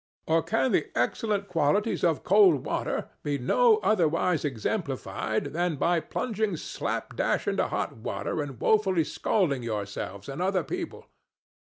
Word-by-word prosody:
Or 165 +1 +3
can 225 +8 +1
the - - +2
excellent 210 -4 0
qualities 180 +6 +1
of 165 -4 +2
cold 190 -7 +5
water - - -2
be 145 -1 -1
no 440 - +4
otherwise 170 -3 +2
exemplified 130 -8 -2
than 175 0 0
by 170 +4 +2
plunging 215 0 -2
slapdash - - -2
into - - +1
hot - - -3
water 115 +6 -3
and 135 -5 -6
woefully 195 -6 +3
scalding 150 - 0
yourselves 100 -3 -5
and 140 +5 -5
other 185 0 +1
people? 360 -2 -5
170 Hz, 135 wpm, -27 LUFS, 145-205 Hz, -, cold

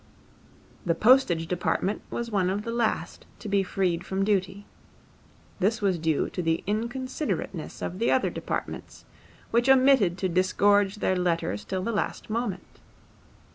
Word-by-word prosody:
The 170 -2 +1
postage 215 -6 +4
department 180 +3 -1
was 235 -1 -4
one 190 -3 +1
of 200 +2 -2
the 230 - -4
last 230 -2 -2
to 220 - -9
be 200 -1 +2
freed 180 -2 -1
from 190 +1 -1
duty. 195 -1 -1 0.9
This 210 +4 +1
was 190 -4 +1
due 160 -2 +1
to 180 - -3
the 165 -1 0
inconsiderateness 250 +8 -3
of 180 - -6
the 230 - +1
other 260 - +2
departments, - - -5 0.5
which 240 +3 +2
omitted 260 -9 +5
to 190 - -1
disgorge 195 +3 +2
their 190 -3 0
letters 165 - -1
till 185 -1 -3
the 230 - -1
last 215 0 -3
moment. 225 -4 -4
195 Hz, 145 wpm, -26 LUFS, 180-230 Hz, 0.9 s, omitted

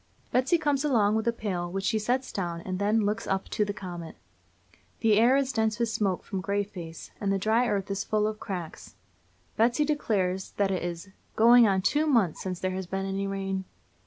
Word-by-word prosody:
Betsy 260 +8 +3
comes 290 -3 0
along 220 -8 +3
with 220 +1 -1
a - - +4
pail, 185 -6 -3
which 195 +1 -3
she 215 +2 +1
sets 250 +5 -1
down, 170 -3 -3
and 185 +1 -4
then 210 +2 +2
looks 215 +3 -2
up 195 0 -1
to 210 - +1
the 205 - -2
comet. 175 -5 -7 0.9
The 215 -2 +4
air 245 +4 +5
is 275 -1 0
dense 220 -1 +1
with 235 -1 0
smoke 200 -5 -1
from 190 - -4
Grayface, 195 -4 -4
and 200 -1 0
the 195 - +2
dry 220 +5 +2
earth 200 -3 -1
is 195 +1 -1
full 210 -1 +1
of 215 0 -2
cracks. 175 -5 -7 0.6
Betsy 240 +7 +3
declares 195 -11 -1
that 200 -1 +2
it 185 - -1
is 175 +2 -5 0.3
"going 235 +1 +7
on 190 -2 +1
two 300 +8 +2
months 225 - +2
since 185 -2 -4
there 185 - -1
has 185 -1 -4
been 195 +1 -3
any 195 +1 -2
rain." 195 -1 -3
205 Hz, 205 wpm, -27 LUFS, 190-230 Hz, 0.9 s, going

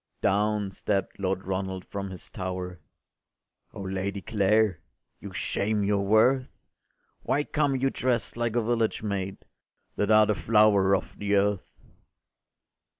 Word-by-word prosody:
Down 105 0 +1
stept 95 0 -2
Lord 95 0 -1
Ronald 95 0 -3
from 100 -1 -5
his 95 -2 -10
tower: 90 -1 -5 0.9
“O - - -9
Lady 95 +1 -3
Clare, 105 -1 +2 0.4
you 100 - -8
shame 105 +2 -1
your 100 0 +1
worth! 120 +6 +4 0.7
Why 145 - 0
come 145 -2 0
you 135 +1 +1
drest 125 -2 -1
like 120 -1 -1
a 120 - +2
village 115 -1 0
maid, 95 -2 -3 0.6
That 105 - 0
are 110 0 +7
the 105 - +1
flower 100 +1 +4
of - - -5
the 100 0 +1
earth? 100 -1 0
100 Hz, 135 wpm, -27 LUFS, 95-110 Hz, 0.9 s, are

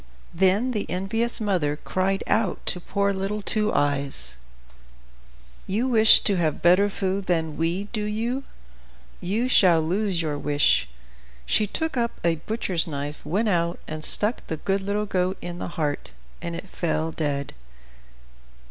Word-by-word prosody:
Then 195 +8 +2
the 210 -4 -3
envious 225 +7 -1
mother 180 -9 0
cried 190 +4 -1
out 210 -3 0
to 180 - -1
poor 200 +2 0
little 195 +2 -3
Two 215 +1 0
Eyes, 140 - -1 1.3
"You 220 +7 0
wish 220 -3 +7
to 200 -3 +2
have 160 -3 -1
better 185 +4 +5
food 195 0 -2
than 160 -3 0
we, 170 +4 -1
do 210 -2 -1
you? 230 +6 -2 0.8
You 215 +7 -1
shall 180 -9 +5
lose 185 +3 0
your 150 -3 -2
wish!" 145 - +2 0.6
She 210 - +1
took 320 +6 -2
up 235 -1 -1
a 165 -1 +2
butcher's 185 -2 -2
knife, 145 -1 -5
went 210 +6 0
out, 170 -2 0
and 155 0 -6
stuck 210 +8 +3
the 160 - -3
good 195 +5 -1
little 205 +2 -1
goat 185 -1 -1
in 175 0 -7
the - - -4
heart, 150 -3 -2 0.3
and 170 0 -4
it 195 - -7
fell 160 -3 -2
dead. 145 -3 -2
185 Hz, 150 wpm, -24 LUFS, 160-210 Hz, 1.3 s, wish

